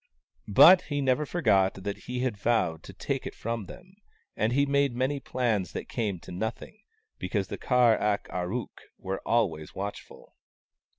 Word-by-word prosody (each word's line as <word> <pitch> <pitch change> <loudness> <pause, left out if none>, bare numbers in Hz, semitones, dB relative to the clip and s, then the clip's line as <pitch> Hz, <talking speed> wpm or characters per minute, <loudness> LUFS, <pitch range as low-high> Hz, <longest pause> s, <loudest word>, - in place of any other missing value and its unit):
But 175 - +8
he 145 -1 -1
never 140 +2 +1
forgot 95 - +2
that 100 +1 -6
he 125 0 -2
had 130 -4 -1
vowed 100 -7 0
to - - -9
take - - -3
it - - -8
from 115 -3 -4
them, 185 - -13 0.4
and 110 +2 0
he 140 +3 +3
made 140 -2 +1
many 130 +3 0
plans 115 -10 -1
that - - -5
came 105 -5 -2
to - - -11
nothing, 110 - -5 0.4
because - - -2
the - - -5
Kar 125 -3 +4
ak 105 -1 0
ar 90 0 -3
ook 125 0 -5 0.2
were 95 +1 -4
always 95 -10 0
watchful. 100 +1 -7
115 Hz, 170 wpm, -28 LUFS, 100-130 Hz, 0.4 s, But